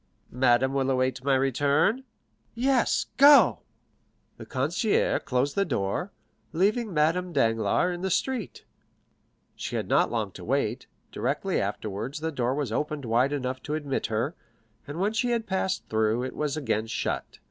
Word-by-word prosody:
"Madame 130 +1 +3
will 135 -1 0
await 130 -1 0
my 135 0 +3
return?" 145 - +2 0.5
"Yes; 255 +1 +2
go." 285 +1 +7 0.8
The - - -10
concierge 155 - +1
closed 130 +3 0
the 200 - +2
door, 140 - -2 0.4
leaving 210 +6 +1
Madame 165 +3 +1
Danglars 125 +7 +2
in 175 - -6
the 190 - -1
street. 255 +7 -2 0.9
She - - -5
had - - -2
not - - +3
long - - -2
to - - -11
wait; - - -1 0.2
directly 195 -1 -1
afterwards 105 +7 -4
the 160 +1 -2
door 130 -2 -1
was 140 -6 -2
opened 150 +2 -2
wide 120 +4 +2
enough 130 -2 -3
to 150 - -3
admit 145 -3 -2
her, 115 +8 -1 0.5
and 145 +4 -6
when 205 +3 +1
she 245 +2 0
had 235 -2 0
passed 190 -1 -1
through, 110 +2 +1
it 130 - -5
was 150 0 -2
again 115 -7 -1
shut. - - -3
145 Hz, 155 wpm, -27 LUFS, 130-185 Hz, 0.9 s, go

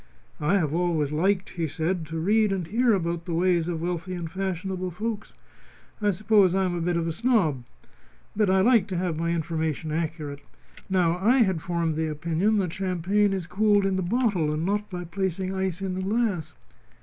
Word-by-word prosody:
"I 155 +6 +2
have 155 -6 0
always 165 -4 0
liked," 190 +5 +1
he 165 -2 -3
said, 160 +2 -2
"to 165 +1 -5
read 210 +5 +2
and 190 -3 -1
hear 230 +7 +2
about 170 -3 -1
the 170 - -2
ways 175 -1 +2
of 165 -2 -3
wealthy 180 +1 -3
and 170 -2 -4
fashionable 185 0 -3
folks. 215 +4 -5 0.7
I 210 - +2
suppose 200 -1 +3
I 190 0 +2
am 180 - -1
a 175 - -2
bit 175 +1 0
of 170 - -1
a - - 0
snob. 180 - +1 0.7
But 210 -2 +2
I 190 0 +4
like 225 -2 +4
to 185 -4 -3
have 175 -3 -1
my 170 0 0
information 160 -2 -2
accurate. 155 -3 -3 0.5
Now, 180 -2 +2
I 240 +6 +4
had 190 -6 -1
formed 170 -2 -1
the 160 +1 -1
opinion 165 +7 0
that 185 -5 0
champagn 190 +2 +1
is 190 -3 -2
cooled 205 +2 +2
in 195 -1 +1
the 190 - 0
bottle 185 -5 +1
and 155 +2 -2
not 205 +2 -1
by 180 -2 -5
placing 190 +1 -2
ice 190 -1 -2
in 190 -1 -2
the 185 - -3
glass." 200 -4 -1
180 Hz, 195 wpm, -26 LUFS, 165-195 Hz, 0.7 s, I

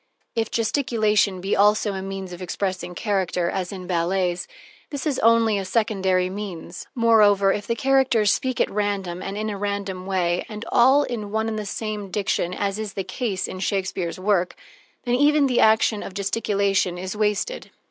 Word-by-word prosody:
If 225 -1 0
gesticulation 220 -5 +1
be 195 +2 0
also 210 +1 +3
a 190 - -4
means 195 -1 -6
of 175 - -9
expressing 185 0 -3
character, 185 -4 0
as 185 -2 -3
in 185 -2 -7
ballets, 180 0 0 0.4
this 285 -2 -5
is 290 -4 0
only 225 -2 +4
a - - -3
secondary 190 -3 +1
means. 185 -3 -7
Moreover, 210 -4 +4
if 205 - -5
the 230 - 0
characters 260 -5 +3
speak 255 -1 -2
at - - +1
random 195 -4 -2
and 195 +1 -5
in 215 +1 -2
a 205 -2 -3
random 200 -2 -3
way, 180 -2 0
and 215 +1 -7
all 265 +4 +5
in 225 -6 -4
one 220 +1 -1
and 220 -1 -2
the 210 - -5
same 210 -1 -4
diction, 185 -2 -1
as 200 +2 -2
is 215 -2 -4
the 195 - -3
case 190 0 -3
in 185 - -7
Shakespeare's 190 -3 -2
work, 185 -2 +1 0.5
then 245 - -1
even 290 +3 +4
the 255 -3 +2
action 220 -1 +4
of 190 - -8
gesticulation 200 -3 0
is 185 +2 -5
wasted. 210 - -1
200 Hz, 180 wpm, -23 LUFS, 190-220 Hz, 0.5 s, all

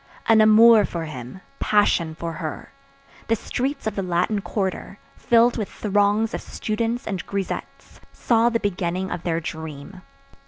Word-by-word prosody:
An 225 -1 +5
amour 220 0 +7
for 170 -4 -4
him; 130 +3 -9 0.2
passion 175 -6 +2
for 165 0 -5
her. 155 -1 -6 0.6
The 225 - +2
streets 270 +5 -3
of 220 -2 -2
the 195 - -1
Latin 180 +3 0
quarter, 195 -1 -3 0.2
filled 235 +1 +3
with 215 -3 -3
throngs 205 +2 +1
of - - -3
students 230 +2 -3
and 195 -3 -3
grisettes, 200 -2 -6
saw 230 0 +2
the 230 -1 0
beginning 185 -2 -2
of 175 - -4
their 165 -1 -1
dream. 160 +2 -8
200 Hz, 150 wpm, -23 LUFS, 170-225 Hz, 0.6 s, amour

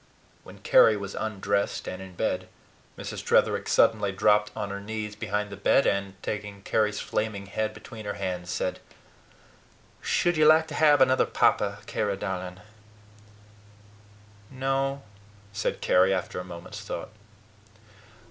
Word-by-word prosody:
When - - -13
Carry 110 - +6
was 100 -1 -6
undressed 100 -2 -2
and 90 0 -5
in 95 -1 -10
bed, - - -1 0.5
Mrs. - - -6
Tretherick - - +2
suddenly 105 -3 +3
dropped 105 +2 +3
on 100 -1 -4
her 100 - -4
knees 105 0 -5
beside 105 -1 -2
the - - -6
bed, 100 +7 +3
and, 100 -1 0
taking 105 -2 -5
Carry's 105 -1 +1
flaming 105 -2 -2
head 110 +2 -2
between 110 0 -10
her 100 - -3
hands, 90 -3 -4
said: - - -2 1.2
"Should 175 -1 +1
you 155 0 +5
like 160 +1 +6
to - - -7
have 145 -2 +5
another 130 0 +4
papa, - - +1
Carry, 100 -2 -1
darling?" 90 -2 -5 1.9
"No," 135 +1 -1 0.5
said 105 - -2
Carry, 95 +1 +4
after 95 -1 -2
a - - -4
moment's 85 -1 -9
thought. - - -6
105 Hz, 140 wpm, -27 LUFS, 95-110 Hz, 1.9 s, Carry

